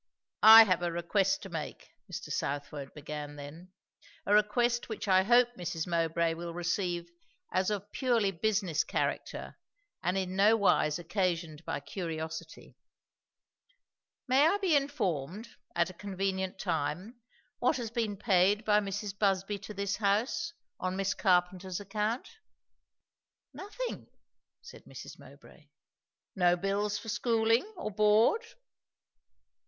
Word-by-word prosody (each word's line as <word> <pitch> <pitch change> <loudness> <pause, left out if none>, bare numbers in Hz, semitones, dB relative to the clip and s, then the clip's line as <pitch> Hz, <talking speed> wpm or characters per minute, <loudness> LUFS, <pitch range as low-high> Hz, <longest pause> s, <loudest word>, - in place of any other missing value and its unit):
"I 220 +1 +11
have 185 -5 +1
a 175 -1 -1
request 190 +3 0
to 195 - -8
make," 160 -4 -6 0.2
Mr. - - -6
Southwode 140 0 -4
began 150 0 -7
then; 150 +6 -10 0.5
"a 205 - +2
request 235 +4 +2
which 220 -1 -5
I 185 -1 +5
hope 240 +4 +5
Mrs. 175 -3 -4
Mowbray 165 -1 0
will 170 0 -6
receive 175 -1 -2 0.4
as 185 +1 +1
of 205 -1 -4
purely 235 -7 +1
business 195 -3 0
character, - - -3 0.4
and 180 +2 0
in 185 -1 -2
no 210 +3 +5
wise 155 -7 +2
occasioned 170 -3 -2
by - - -3
curiosity. 160 0 -6 1.5
May 270 +4 +5
I 395 - +2
be 380 -6 +2
informed, 210 - -2 0.3
at 170 +2 +1
a - - -15
convenient 190 0 -3
time, 180 - -3 0.4
what 255 - +2
has 235 -3 -5
been 225 -4 -2
paid 205 0 +2
by 210 -1 +4
Mrs. 205 0 -4
Busby 200 0 0
to 210 - -9
this 200 0 -2
house, 220 +11 0 0.3
on 185 0 -2
Miss 195 0 0
Carpenter's 180 0 +1
account?" 210 +4 -2 1.3
"Nothing," 425 +5 -6 0.6
said - - -13
Mrs. - - -10
Mowbray. - - -17 0.7
"No 175 -2 +4
bills 200 +3 -1
for - - -10
schooling? 230 - +1
or 215 - -4
board?" 215 - +4
195 Hz, 125 wpm, -30 LUFS, 175-215 Hz, 1.5 s, I